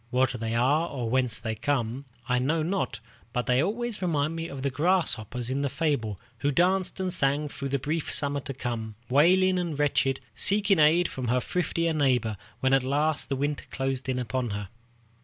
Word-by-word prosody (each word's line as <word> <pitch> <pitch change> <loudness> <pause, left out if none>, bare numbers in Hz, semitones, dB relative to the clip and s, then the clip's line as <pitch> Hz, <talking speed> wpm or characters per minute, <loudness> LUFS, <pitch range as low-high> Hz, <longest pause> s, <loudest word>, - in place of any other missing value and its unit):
What 130 +2 +2
they 115 0 -2
are 145 +8 +2
or 120 -5 -3
whence 125 -4 +1
they 110 0 -3
come, 120 +2 -2 0.2
I 125 -1 +2
know 155 +5 +1
not, 175 - -1 0.3
but 125 - -1
they 125 +1 +3
always 225 +5 -2
remind 160 -3 0
me 165 0 -4
of 135 -3 -7
the 140 - 0
grasshopper 145 - 0
in 135 +2 -1
the 140 - 0
fable, 130 - -1 0.2
who 145 - +1
danced 185 +6 +1
and 185 -1 -1
sang 145 -1 +1
through 140 -1 -5
the 140 - +1
brief 150 +4 -2
summer, 145 0 +1
to 135 0 -6
come, 115 -4 -4
wailing 185 +7 +4
and 170 -5 -3
wretched, 135 -2 +1
seeking 200 - +3
aid 160 +4 +5
from 130 -2 -5
her 125 +2 +2
thriftier 165 +2 -1
neighbor 125 -7 +2 0.3
when 130 0 +2
at 135 - +5
last 145 +4 0
the 135 - 0
winter 145 +2 -2
closed 135 0 -3
in 130 - 0
upon 125 0 -2
her. 100 -2 -4
140 Hz, 195 wpm, -27 LUFS, 125-165 Hz, 0.3 s, aid